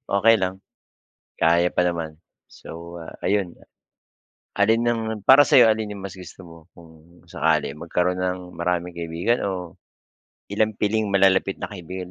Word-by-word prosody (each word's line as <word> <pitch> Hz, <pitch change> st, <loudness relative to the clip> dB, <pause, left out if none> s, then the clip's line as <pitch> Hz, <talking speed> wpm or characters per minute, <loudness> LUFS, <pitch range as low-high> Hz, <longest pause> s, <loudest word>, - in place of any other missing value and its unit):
Okey 115 Hz, +3 st, +5 dB
lang. 95 Hz, 0 st, -3 dB, 0.8 s
Kaya 85 Hz, +2 st, +3 dB
pa 90 Hz, -, +2 dB
naman. 85 Hz, -3 st, -2 dB, 0.3 s
So, 85 Hz, +1 st, -10 dB
ah, -, -, -11 dB
ayun, 95 Hz, -3 st, 0 dB
ah -, -, -21 dB, 0.9 s
alin 110 Hz, +3 st, +2 dB
ang 120 Hz, -1 st, 0 dB, 0.2 s
para 135 Hz, +5 st, +7 dB
sa'yo 115 Hz, -4 st, +6 dB
alin 110 Hz, -1 st, -3 dB
yung 100 Hz, -, -10 dB
mas 100 Hz, -, -6 dB
gusto 95 Hz, 0 st, -12 dB
mo 85 Hz, -1 st, -13 dB, 0.2 s
kung 85 Hz, +1 st, -19 dB
sakali -, -, 0 dB
magkaroon 90 Hz, +4 st, -2 dB
ng 90 Hz, 0 st, -1 dB
maraming 90 Hz, +1 st, -2 dB
kaibigan 85 Hz, +7 st, -2 dB
o 90 Hz, -3 st, -6 dB, 0.7 s
ilang 110 Hz, +1 st, 0 dB
piling 105 Hz, +2 st, 0 dB
malalapit 95 Hz, -1 st, +3 dB
na -, -, -7 dB
kaibigan 90 Hz, -1 st, -8 dB
90 Hz, 150 wpm, -23 LUFS, 85-105 Hz, 0.9 s, para